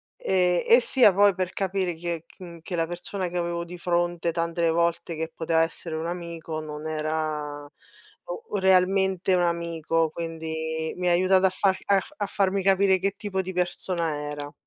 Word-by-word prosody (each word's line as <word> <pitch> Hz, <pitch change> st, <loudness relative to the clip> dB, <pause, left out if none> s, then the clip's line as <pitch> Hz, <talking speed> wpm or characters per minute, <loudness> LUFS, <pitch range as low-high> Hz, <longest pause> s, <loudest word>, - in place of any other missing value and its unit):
e 180 Hz, -2 st, +1 dB
e 235 Hz, -, +8 dB
sia 240 Hz, -6 st, +5 dB
poi 200 Hz, 0 st, +5 dB
per 185 Hz, -1 st, -2 dB
capire 190 Hz, -3 st, -1 dB
chi 175 Hz, +2 st, -8 dB
è 165 Hz, -1 st, -3 dB
ch 170 Hz, -3 st, -12 dB
che 175 Hz, +1 st, -5 dB
la 165 Hz, -1 st, 0 dB
persona 180 Hz, +2 st, -4 dB
che 180 Hz, -, -4 dB
avevo 170 Hz, 0 st, -2 dB
di 180 Hz, +1 st, -9 dB
fronte 175 Hz, -1 st, 0 dB
tante 170 Hz, 0 st, 0 dB
volte 170 Hz, 0 st, 0 dB
che 160 Hz, +1 st, -4 dB
poteva 165 Hz, 0 st, +1 dB
essere 165 Hz, 0 st, -3 dB
un 160 Hz, +1 st, -3 dB
amico 170 Hz, -2 st, -5 dB
non 155 Hz, 0 st, -6 dB
era 155 Hz, -2 st, -3 dB, 0.7 s
o 460 Hz, -, -5 dB
realmente 190 Hz, 0 st, +3 dB
un 180 Hz, -, +3 dB
amico, 165 Hz, -1 st, 0 dB
quindi 160 Hz, -1 st, -4 dB
mi 180 Hz, 0 st, -1 dB
ha -, -, +4 dB
aiutata 185 Hz, +1 st, +4 dB
a -, -, +2 dB
far 190 Hz, 0 st, +1 dB
a 200 Hz, +4 st, +1 dB
farmi 195 Hz, -1 st, +1 dB
capire 190 Hz, -1 st, +4 dB
che 195 Hz, +1 st, -1 dB
tipo 190 Hz, -3 st, -2 dB
di 185 Hz, 0 st, -5 dB
persona 175 Hz, -2 st, -1 dB
era. 145 Hz, 0 st, -6 dB
175 Hz, 175 wpm, -26 LUFS, 165-190 Hz, 0.7 s, e